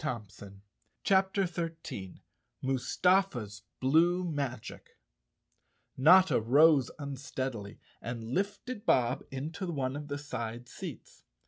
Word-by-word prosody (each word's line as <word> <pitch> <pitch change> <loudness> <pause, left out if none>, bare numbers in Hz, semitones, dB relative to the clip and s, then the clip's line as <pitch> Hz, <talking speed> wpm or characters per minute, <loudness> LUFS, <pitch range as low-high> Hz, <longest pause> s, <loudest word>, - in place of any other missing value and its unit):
171 100 -7 -6 0.4
CHAPTER 190 0 +3
13 165 - -6 0.4
Mustafa's 130 - +1 0.2
Blue 170 +7 +3
Magic 140 - -5 1.0
N 130 - -5
OTTA 185 -6 +7
rose 140 +3 +5
unsteadily 130 -6 -5 0.2
and 115 -1 -5
lifted 205 - -2
Bob 125 +1 +3
into 155 +8 -5
one 135 -3 -2
of 145 0 -6
the 145 -1 -3
side 120 -4 -5
seats. - - -9
140 Hz, 100 wpm, -31 LUFS, 120-170 Hz, 1.0 s, OTTA